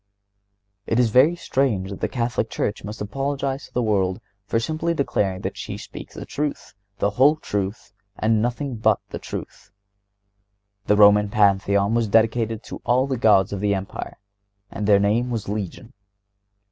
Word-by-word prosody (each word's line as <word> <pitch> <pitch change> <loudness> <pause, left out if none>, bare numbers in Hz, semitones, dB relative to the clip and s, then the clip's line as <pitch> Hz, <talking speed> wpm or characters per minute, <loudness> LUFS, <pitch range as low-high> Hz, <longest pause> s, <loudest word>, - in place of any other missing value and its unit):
It 115 - +1
is 120 -3 +3
very 135 +9 +5
strange 115 - -1
that 100 - -7
the - - +1
Catholic 120 -3 -1
Church 105 - -2
must 105 +2 -7
apologize 135 +4 -3
to - - -27
the 125 - +1
world 95 -3 +1 0.3
for 115 - +1
simply 160 +6 -1
declaring 100 - -1
that - - -4
she - - -5
speaks - - -10
the - - -7
truth, 145 0 -4 0.2
the 100 - +1
whole 135 +8 +5
truth, 105 -6 -4 0.2
and 110 0 +2
nothing 125 +2 -2
but 110 - +3
the - - -5
truth. - - -8 1.2
The 105 - +4
Roman 105 0 +6
Pantheon 100 0 +2
was 115 -1 +1
dedicated 115 +1 +1
to - - -9
all 125 +2 +2
the 135 -1 -2
gods 105 -4 +3
of 100 - -3
the 100 0 +1
Empire, 95 0 -6 0.5
and 100 +1 -3
their 105 -2 +6
name 110 +5 +1
was 115 -4 -3
legion. 105 +4 -5
110 Hz, 165 wpm, -23 LUFS, 100-125 Hz, 1.2 s, Roman